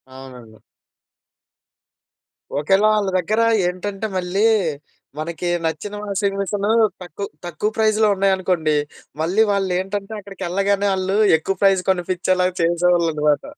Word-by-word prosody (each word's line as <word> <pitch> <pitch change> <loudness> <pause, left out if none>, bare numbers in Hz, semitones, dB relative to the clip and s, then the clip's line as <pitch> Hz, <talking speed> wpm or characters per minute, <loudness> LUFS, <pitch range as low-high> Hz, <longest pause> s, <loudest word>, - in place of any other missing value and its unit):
అవునండి. 125 -4 -12 2.0
ఒకవేళ 195 +8 +2
ఆళ్ళ 210 -2 0
దగ్గరేంటంటే 205 -1 0
మళ్ళీ 185 +3 -1 0.8
మనకి 170 +2 -4 0.2
నచ్చిన 160 +6 -3
వాషింగ్ 200 -1 -1
మిషను 200 +1 -2 0.3
తక్కువ, 180 +3 -6 0.2
తక్కువ 175 +5 -2
ప్రైజ్‌లో 215 0 +3
ఉన్నాయనుకోండి 185 -5 +1 0.5
మళ్ళీ 185 +7 +3
వాళ్ళేంటంటే 195 +1 -2
అక్కడికెళ్ళగానే 195 +1 -1
వాళ్ళు 190 +1 -1 0.2
ఎక్కువ 195 +5 -3
ప్రైజ్ 195 -2 +4
కొనిపించేలా 185 0 +1 0.2
చేసేవాళ్ళనమాట. 165 -4 +2
190 Hz, 95 wpm, -20 LUFS, 170-200 Hz, 2.0 s, ప్రైజ్